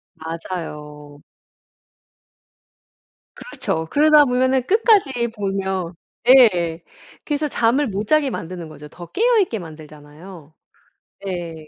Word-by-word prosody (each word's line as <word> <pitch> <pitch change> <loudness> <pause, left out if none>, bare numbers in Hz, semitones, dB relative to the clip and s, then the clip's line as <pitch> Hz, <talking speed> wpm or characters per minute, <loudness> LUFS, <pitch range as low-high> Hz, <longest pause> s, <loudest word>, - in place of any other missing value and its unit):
맞아요. 150 -3 -8 2.1
그렇죠. 160 - -4
그러다 300 0 +5
보면은 260 0 +1
끝까지 375 - +2
보면 190 -3 -3 0.4
예. 180 -11 +5 0.4
그래서 300 0 -1
잠을 260 +2 +1
못 205 +1 -4
자게 305 -3 +2
만드는 170 -6 -7
거죠. 150 -1 -12
더 175 +3 -12
깨어 470 +3 +2
있게 235 - -2
만들잖아요. 155 +1 -13 0.8
예. 175 -3 -5
190 Hz, 215 characters per minute, -20 LUFS, 160-265 Hz, 2.1 s, 그러다